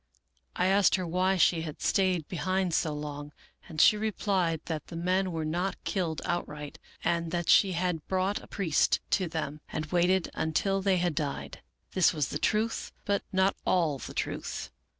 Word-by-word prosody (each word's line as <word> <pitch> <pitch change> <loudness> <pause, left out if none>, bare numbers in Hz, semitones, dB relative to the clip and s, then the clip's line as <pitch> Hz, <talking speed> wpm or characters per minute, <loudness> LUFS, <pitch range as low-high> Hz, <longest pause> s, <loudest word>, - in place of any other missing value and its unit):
I 180 - +1
asked 195 +1 +4
her 185 -2 -2
why 185 +3 +1
she 170 -1 +4
had 155 -2 -6
stayed 185 -5 +1
behind 185 0 -1
so 160 -1 +1
long, 150 0 -6 0.4
and 160 -2 -6
she 210 - +7
replied 195 -6 0
that 155 -3 -4
the 170 - -8
men 185 +2 +1
were 160 -2 -2
not 175 +5 -1
killed 170 -5 -2
outright, 150 -4 -4 0.2
and 170 -1 0
that 175 0 -2
she 195 -2 +5
had 175 -2 -1
brought 190 +2 0
a - - -14
priest 175 -7 +1
to 185 -3 +2
them 155 -2 -4
and 155 - -2
waited 180 +1 +2
until 195 +5 0
they 190 -1 +2
had 175 -2 +1
died. 145 -2 -4 0.3
This 185 -3 +4
was 150 -3 0
the 150 - -3
truth, 220 +6 0
but 200 -1 +1
not 190 +1 +2
all 160 -6 +1
the - - -8
truth. - - -4
175 Hz, 175 wpm, -29 LUFS, 160-190 Hz, 0.4 s, she